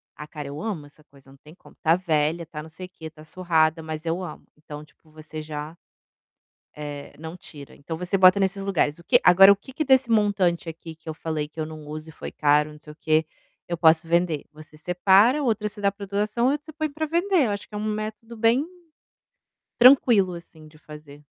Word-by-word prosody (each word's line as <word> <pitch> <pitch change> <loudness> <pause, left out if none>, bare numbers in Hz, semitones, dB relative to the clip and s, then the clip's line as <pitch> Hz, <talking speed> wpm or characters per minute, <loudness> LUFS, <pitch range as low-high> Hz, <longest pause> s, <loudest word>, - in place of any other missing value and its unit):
"Ah 150 - -9
cara 150 -2 -8
eu 145 +2 -7
amo 185 -9 -4
essa 145 +1 -19
coisa, 140 -3 -21
não 135 - -18
tem 150 +3 -17
como, - - -20
está 165 0 +2
velha, 165 -2 0
está 150 -1 -8
não 160 - -12
sei 185 +4 -9
o - - -32
que, 165 -3 -13
está 155 -1 -10
surrada, 160 -1 +1
mas 155 0 -6
eu 170 +3 -2
amo". 180 - -9
Então 150 0 -10
tipo 155 +1 -27
você 155 0 -9
já, 155 +1 -7 1.0
eh, 145 -1 -8
não 160 +2 -8
tira, 145 -5 -12
então 160 +3 -7
você 180 +3 -1
bota 185 +1 +6
nesses 195 0 -1
lugares, 165 -5 0
o - - -15
que - - +4
agora 190 +2 +8
o - - +5
que 200 +7 -14
que 310 - -2
desse 265 -2 +3
montante 200 -6 +1
aqui 165 0 -10
que 160 +1 -27
eu - - -3
falei 155 -1 -4
que 155 +2 -13
eu 155 - -1
não 155 -1 -10
uso 155 +1 -8
e - - -10
foi - - -8
caro, 150 0 +2
não 150 - -15
sei 150 - -13
o - - -24
que, 155 0 +1 0.4
eu 170 - -3
posso 165 0 +4
vender? 170 -3 0
Você 155 0 -15
separa, 195 - +3
outra 215 -4 0
você 210 +1 -10
dá 200 0 +2
para 200 0 -9
doação, 210 +4 0
outra 290 +2 -1
você 315 - -11
põe 310 0 -2
para 310 +2 -3
vender, 340 0 +1
eu 215 - -1
acho 205 0 -6
que 210 - -10
é - - -2
um 210 - -4
método 215 +2 -6
bem, 230 +6 +2 1.1
tranquilo 235 -7 +6
assim 165 -2 -13
de 155 0 -19
fazer. 150 -2 -13
170 Hz, 230 wpm, -24 LUFS, 155-205 Hz, 1.1 s, agora